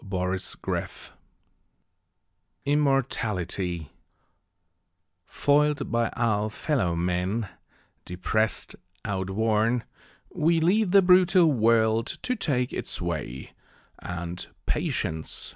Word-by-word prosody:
Matthew 100 -3 -4 0.5
Arnold - - -4 1.5
Immortality 105 - 0 1.4
FOIL'D 145 0 +1
by 115 -1 +1
our 110 -3 +1
fellow 105 - -1
men, 90 +5 -1 0.6
depress'd, 105 +5 -1 0.3
outworn, 110 +4 0 0.5
We 165 +2 +2
leave 190 +5 +2
the 195 +1 +6
brutal 180 -2 +5
world 115 -2 +3 0.2
to 250 - 0
take 135 - -1
its - - -3
way, 80 -7 -4 0.5
And, 85 0 -6 0.2
Patience! 80 0 -1
110 Hz, 80 wpm, -26 LUFS, 90-145 Hz, 1.5 s, the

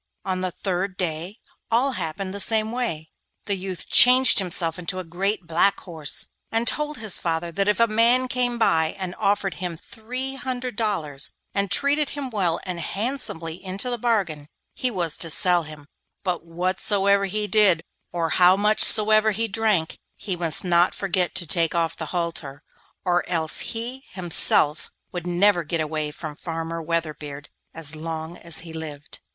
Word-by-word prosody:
On 185 -1 -2
the 185 - -1
third 185 +1 -4
day 175 +3 -4 0.3
all 245 +4 +1
happened 185 -2 -5
in - - -7
the 200 - -6
same 220 +1 +3
way. 170 -11 -3 0.3
The 200 - -1
youth 185 -2 -6
changed 255 -1 +6
himself 175 -2 +4
into 180 +1 -4
a 185 - -4
great 185 +3 -3
black 170 +4 +1
horse, 160 -5 -3 0.3
and 225 +1 -1
told 300 +3 0
his 220 -4 +1
father 170 0 -3
that 195 +3 -1
if 210 -2 +1
a 230 - +6
man 230 +3 +3
came 245 -1 -1
and 175 -1 0
offered 200 -2 0
him 175 -3 -4
three 250 +8 -6
hundred 255 -2 -5
dollars, 160 -11 -2 0.2
and 200 -1 -1
treated 285 +7 +2
him 270 -3 -5
well 180 -6 0
and 180 -2 -5
handsomely 185 -6 -4
into 195 +7 -4
the 240 - -3
bargain, 190 -11 -1 0.3
he 255 - -2
was 175 -8 -3
to 165 - -2
sell 175 +4 +4
him, 155 -2 -12 0.4
but 180 -4 -2
whatsoever 195 +4 +1
he 210 +2 -3
did, 205 -6 +3 0.3
or 170 -2 -2
how 180 +3 +5
much 210 +1 +3
soever 215 0 +7
he 225 +2 -1
drank, 210 -6 -1 0.2
he 190 - -4
must 170 0 +3
not 175 0 +2
forget 185 -2 -1
to 185 -2 -1
take 165 +1 0
off 165 -1 0
the 160 - -6
halter, 165 -5 -5 0.4
or 175 -1 +1
else 160 -3 +3
he 245 +4 -5
himself 155 -4 +4 0.2
would 175 -1 -6
never 175 0 +2
get 165 +2 -3
away 155 -1 -3
from 150 0 -8
Farmer 165 +1 -5
Weatherbeard 155 -3 -5 0.2
as 160 -1 -1
long 160 +1 -6
as 170 -1 -5
he 165 -1 -10
lived. 150 -3 -9
185 Hz, 170 wpm, -23 LUFS, 165-215 Hz, 0.4 s, soever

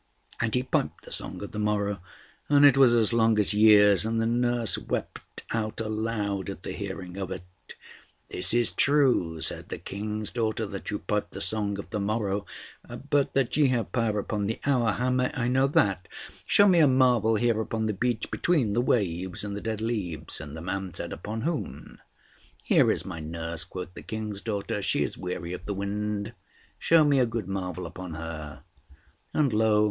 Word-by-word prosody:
And 110 0 0
he 125 - +1
piped - - -2
the - - -11
song - - -3
of 100 - -7
the 105 - -5
morrow, 105 -2 0 0.5
and 145 0 +6
it 140 -2 +7
was 135 -3 +6
as 115 -1 +2
long 115 -1 +3
as 105 0 +3
years; 105 -2 +6
and 115 +1 0
the 115 - +1
nurse 120 -1 +1
wept - - -5
out 110 -1 -2
aloud 110 -3 -2
at 95 -2 -7
the - - -4
hearing 95 -2 -6
of 95 -2 -4
it. - - -5 0.8
"This 90 - -1
is 120 0 +3
true," 130 - +2
said - - -2
the - - -4
King's 105 +1 -4
daughter, 110 -1 -1
"that 100 -1 -6
you 105 - -1
pipe 105 0 -2
the 95 - -8
song 100 -1 -1
of 100 - -8
the 105 - -2
morrow; 100 -1 -1 0.6
but 145 -1 +2
that 135 -3 +1
ye 150 -2 +5
have 125 -3 -1
power 115 -4 0
upon 105 0 -2
the 110 - -3
hour, 125 -6 +2
how 125 +1 0
may 125 0 +1
I 120 -2 0
know 130 +2 +3
that? 100 -9 +1 0.4
Show 205 - +6
me 180 -3 +5
a 155 - +7
marvel 125 -4 +4
here 115 0 +2
upon 110 0 -2
the 110 - 0
beach, 115 +3 -1
between 140 -12 +1
the 120 - +2
waves 95 -7 0
and 100 -1 -4
the 105 - -5
dead 110 -1 -3
leaves." 105 -9 -3
And 70 +2 -8
the - - -7
man 95 +1 -3
said, - - -5
"Upon 110 +6 -5
whom?" 160 +3 -4 0.6
"Here - - +4
is - - 0
my 85 - -6
nurse," 80 +1 -4
quoth 90 0 -7
the - - -9
King's 110 -2 -5
daughter. 105 -2 -3
"She - - +1
is - - -3
weary 90 -1 -5
of 90 0 -7
the 100 - -2
wind. 105 +2 -3 0.5
Show 165 -1 +5
me 145 -2 +3
a 125 - +3
good 115 -5 -4
marvel 90 -2 -4
upon 85 0 -7
her." 80 -2 -7 0.7
And, 140 -6 +1
lo! 110 -1 +3
105 Hz, 195 wpm, -27 LUFS, 100-120 Hz, 0.8 s, it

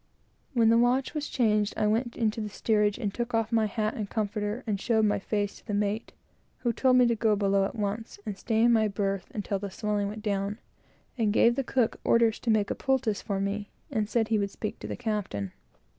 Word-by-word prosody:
When 230 -3 +4
the 230 +1 +5
watch 250 +3 +2
was 300 -2 -3
changed 215 -4 +1
I - - +1
went 230 +3 0
into 220 -1 0
the 210 - -3
steerage, 210 0 +1
and 205 -5 -2
took 240 -1 -2
off 225 0 0
my 225 -2 +3
hat 215 +2 -1
and 210 -3 -4
comforter, 210 +2 -2
and 205 -3 -2
showed 220 -2 +2
my 205 - +2
face 205 0 -2
to - - -20
the 205 - -1
mate, 210 +2 -1 0.5
who 240 -2 +1
told 255 +2 +3
me 250 - +6
to 235 - +3
go 220 -1 +2
below 200 -1 +2
at 195 - -5
once, 215 +1 -3
and 210 -2 -3
stay 220 +3 0
in 235 0 +5
my 220 -1 +4
berth 195 -2 -2
until 200 -2 -2
the 200 0 -4
swelling 205 +1 -1
went 210 +1 -6
down, 200 0 -1 0.6
and 215 -2 +2
gave 235 +3 +4
the 275 - 0
cook 245 -2 0
orders 230 -1 +3
to 235 - -3
make 215 -2 +2
a - - -1
poultice 260 -6 0
for 200 -2 -2
me, 200 +1 -2 0.2
and 215 -5 -1
said 225 0 +1
he 220 -2 +2
would 200 0 0
speak 215 +2 -5
to - - -7
the - - -4
captain. 190 - -3
215 Hz, 230 wpm, -28 LUFS, 205-230 Hz, 0.6 s, me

